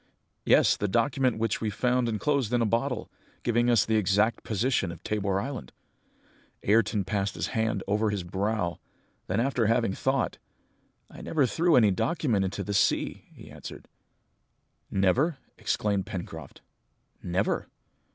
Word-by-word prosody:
"Yes, - - +5
the 105 - -1
document 125 +4 +1
which 110 -2 -1
we 110 - 0
found 125 +3 +1
enclosed 120 +2 0
in 120 - +3
a - - +2
bottle, 120 +2 -1 0.3
giving 120 0 +2
us 120 -4 +4
the 110 0 +2
exact 105 +3 +2
position 110 -3 0
of 85 0 -11
Tabor 100 -2 0
Island!" 115 - -6 0.9
Ayrton 105 -1 +2
passed 100 0 -1
his - - -2
hand 110 -3 -1
over 105 +2 +1
his 100 -3 -2
brow, 95 0 -2 0.5
then 100 +4 0
after 125 -3 +1
having 115 -3 +2
thought, 135 +5 -1 0.7
"I - - -11
never 150 -4 +1
threw 165 +6 +2
any 110 -5 +5
document 120 - 0
into 95 - -3
the 100 - -3
sea!" - - +1
he - - -13
answered. - - -10 1.0
"Never," 125 - +2 0.2
exclaimed 100 -3 0
Pencroft. 80 -6 -7 0.6
"Never!" 90 +2 -1
110 Hz, 140 wpm, -27 LUFS, 100-125 Hz, 1.0 s, Yes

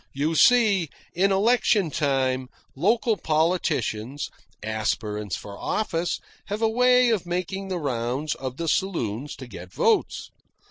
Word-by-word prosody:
You 150 +4 0
see, 200 - +4 0.2
in 195 +3 +2
election 205 -3 +3
time 130 -3 0 0.3
local 220 - +2
politicians, 155 - 0 0.3
aspirants 105 -2 -2
for 100 -1 -9
office, 175 -5 -1 0.3
have 210 +3 -3
a - - +5
way 250 +2 +4
of 195 -6 -1
making 185 +2 -3
the 185 -2 -2
rounds 135 0 -2
of 130 -1 -6
the 170 - -3
saloons 145 - -1
to 130 - -9
get 90 -6 -10
votes. - - +1
160 Hz, 130 wpm, -25 LUFS, 130-195 Hz, 0.3 s, a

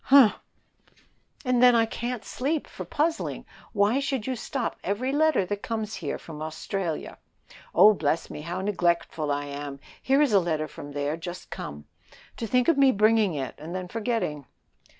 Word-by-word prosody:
"Humph!" 265 -6 +7 1.1
"And 250 -1 +2
then 250 -1 +7
I 230 -1 +4
can't 235 +1 -4
sleep 290 +4 -1
for - - -8
puzzling. 320 +2 -1 0.3
Why 205 +5 +3
should 270 -5 -2
you 260 - -1
stop 245 +1 -3
every 220 +8 -1
letter 300 -8 +3
that 205 +2 -3
comes 220 -2 -3
here 150 -5 -3
from 155 -2 -10
Australia. 160 +2 -4 0.6
Oh, 205 +5 +8
bless 160 -3 0
me, - - -7
how 175 +4 -4
neglectful 170 -5 0
I 145 0 -1
am; 140 -1 -6 0.2
here 270 +1 +3
is 270 -7 +1
a 200 - +7
letter 160 -3 -1
from 145 -1 -10
there, 145 +2 -1
just 175 +2 -8
come. 75 0 -7 0.5
To 230 - -3
think 250 +3 +2
of 330 -4 +4
me 270 -1 +7
bringing 215 -4 +3
it, 135 -3 -3
and 160 +4 -7
then 185 -1 -4
forgetting." 215 - -2
205 Hz, 170 wpm, -26 LUFS, 160-245 Hz, 1.1 s, Oh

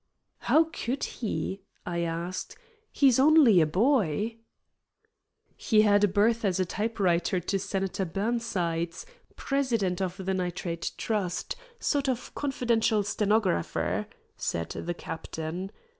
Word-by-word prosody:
"How 320 - +4
could 280 -5 -4
he?" 205 -4 -3 0.2
I 170 -1 -2
asked. 170 +2 -3 0.3
"He's 265 -3 +4
only 275 - +7
a 155 - +3
boy." 215 - +1 1.2
"He 215 -2 +3
had 205 -1 +4
a - - +6
berth 215 +4 +2
as 190 -3 +1
typewriter 185 -4 0
to 195 +3 -1
Senator 195 0 -2
Burnsides, 180 - -2 0.3
president 230 -10 0
of 185 0 -2
the 190 -1 -2
Nitrate 175 -2 -3
Trust, 200 - -2 0.2
sort 280 -2 0
of 250 -1 -3
confidential 235 -6 +1
stenographer," 210 - 0 0.3
said 85 -1 -2
the 175 +1 -4
captain. 160 +3 -5
200 Hz, 115 wpm, -28 LUFS, 175-230 Hz, 1.2 s, only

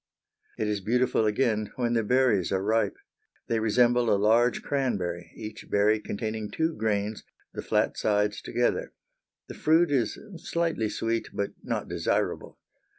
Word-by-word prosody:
It 110 - -1
is 105 -1 -1
beautiful 120 +1 +2
again 110 -1 +1
when 120 -2 0
the 115 - +2
berries 125 -5 +2
are 95 -1 0
ripe. 110 -1 +1 0.5
They 115 - 0
resemble 120 +2 +3
a 100 - +4
large 115 +4 +3
cranberry, 90 - -2
each 110 -1 -8
berry 105 +2 +3
containing 110 0 -4
two 160 +1 0
grains, 105 -1 -1 0.3
the - - -4
flat - - 0
sides 105 0 +1
together. 120 0 -1 0.5
The - - -7
fruit 160 +1 +3
is 130 -5 +1 0.2
slightly 165 - -1
sweet 115 +1 -2
but 100 - -2
not - - -3
desirable. - - -1
110 Hz, 145 wpm, -27 LUFS, 105-125 Hz, 0.5 s, a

